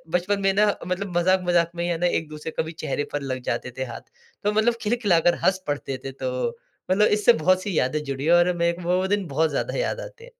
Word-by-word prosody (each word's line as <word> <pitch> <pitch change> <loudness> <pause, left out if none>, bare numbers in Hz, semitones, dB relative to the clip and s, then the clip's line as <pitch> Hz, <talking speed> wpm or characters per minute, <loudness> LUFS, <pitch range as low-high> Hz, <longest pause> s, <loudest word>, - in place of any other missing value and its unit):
बचपन 200 +3 0
में 195 0 +3
ना 210 +2 +4 0.2
मतलब 180 -1 -2
मज़ाक-मज़ाक 175 -1 +3
में 170 - -2
ही 175 - -1
है 170 - 0
ना, 175 - 0
एक-दूसरे 155 -1 -3
कभी 160 +1 -1
चेहरे 155 -3 -3
पर 145 - -1
लग 130 -2 -4
जाते 125 - -3
थे 130 - -1
हाथ। 120 - -8 0.4
तो 210 - +2
मतलब 220 +2 +3
खिलखिला 210 -6 +2
कर 175 - +5
हस 190 0 +2
पढ़ते 140 -2 -3
थे। 135 - -4
तो 130 - -2 0.4
मतलब 210 +3 +5
इससे 210 +3 +4
बहुत 185 +2 +2
सी 195 -6 -2
यादें 150 +4 0
जुड़ी 140 0 -4
है 165 - +4
और 175 +1 +5
मेरे 170 0 +2
को 170 - -4
वो 180 - +3
वो 190 - 0
दिन 205 -1 0
बहुत 155 +3 +1
ज़्यादा 140 - -2
याद - - -1
आते - - -11
हैं। - - -10
175 Hz, 250 wpm, -24 LUFS, 150-195 Hz, 0.4 s, कर